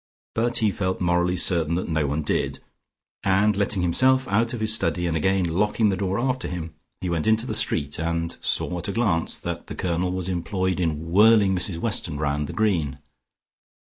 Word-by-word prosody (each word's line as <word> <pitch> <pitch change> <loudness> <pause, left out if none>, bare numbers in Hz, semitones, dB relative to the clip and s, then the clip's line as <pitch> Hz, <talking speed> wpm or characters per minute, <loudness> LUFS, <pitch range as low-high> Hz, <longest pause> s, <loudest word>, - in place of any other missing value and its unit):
But 120 +2 +1
he 110 -3 +2
felt 95 -1 -2
morally 90 0 +1
certain 85 -2 +2
that 90 - -2
no 80 -3 0
one 75 +3 -2
did, - - -1 0.6
and 100 +2 +2
letting 100 -2 -1
himself 130 +9 +3
out 115 +3 +1
of 120 - -4
his 110 0 +2
study, 90 -5 0
and 85 -2 -1
again 95 +4 +1
locking 105 +5 +1
the 95 - 0
door 95 0 -1
after 130 +1 -1
him, 85 -2 -6 0.3
he 95 - -3
went 80 +1 -1
into 110 +1 +3
the 120 - -3
street, 75 -10 0
and 85 0 -2
saw 90 - 0
at - - -4
a 100 - -2
glance 100 -8 0
that - - -6
the - - -7
Colonel 90 0 -1
was 95 -1 -3
employed 95 +1 -1
in 80 -1 -2
whirling 105 0 +5
Mrs 90 -1 -1
Weston 85 -6 -1
round 75 0 -1
the - - -7
Green. 85 -11 0
95 Hz, 195 wpm, -24 LUFS, 85-105 Hz, 0.6 s, whirling